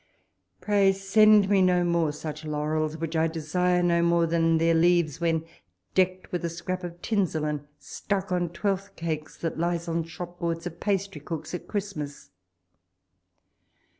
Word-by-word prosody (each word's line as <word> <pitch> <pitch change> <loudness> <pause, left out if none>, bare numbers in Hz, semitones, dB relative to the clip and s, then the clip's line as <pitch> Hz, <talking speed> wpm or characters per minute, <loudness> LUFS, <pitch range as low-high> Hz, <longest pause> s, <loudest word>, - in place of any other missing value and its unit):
Pray 200 -2 +4
send 205 +1 +5
me 195 -1 +4
no 180 -1 +4
more 170 -3 +1
such 155 +1 -6
laurels, 155 +1 -1
which 165 0 -4
I 160 0 +3
desire 175 +3 0
no 170 -1 +3
more 170 0 +3
than 165 0 +2
their 165 +1 +3
leaves 165 -2 +3
when 165 -1 +1 0.5
decked 185 0 +1
with 180 0 -2
a 170 - 0
scrap 180 +2 -4
of 175 0 -7
tinsel, 185 -8 0
and 150 -1 -3
stuck 195 +4 -3
on 175 -1 0
twelfth 195 +3 -2
cakes 155 -2 -4
that 165 -1 -3
lies 170 0 -1
on 165 0 0
shop 175 +1 -8
boards 165 -1 -2
of 170 -1 -6
pastrycooks 185 -6 -3
at 180 - -5
Christmas. 190 -9 -5
170 Hz, 155 wpm, -27 LUFS, 160-185 Hz, 0.5 s, send